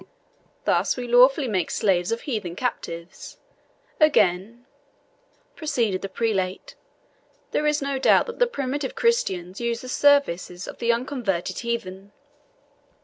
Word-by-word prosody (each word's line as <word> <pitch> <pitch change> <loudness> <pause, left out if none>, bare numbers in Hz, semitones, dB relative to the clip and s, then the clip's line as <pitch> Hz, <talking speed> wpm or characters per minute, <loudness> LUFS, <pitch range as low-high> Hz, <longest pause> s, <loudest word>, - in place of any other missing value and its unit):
Thus - - +1
we 245 -1 -4
lawfully 255 +3 +5
make 190 -6 -1
slaves 180 -3 +1
of 230 - -2
heathen 210 - -4
captives. 170 -8 -5 0.6
Again," 235 - +2 0.9
proceeded 235 - -1
the 195 - -5
prelate, 195 -5 -2 0.8
"there 300 - 0
is 300 -1 +1
no 275 -1 -2
doubt - - +4
that 470 - -8
the - - +4
primitive 275 - -3
Christians 190 - 0
used 235 0 -2
the - - -8
services 250 -11 +2
of - - -9
the 235 0 +2
unconverted 235 - -2
heathen. 200 -4 -5
235 Hz, 125 wpm, -24 LUFS, 190-275 Hz, 0.9 s, lawfully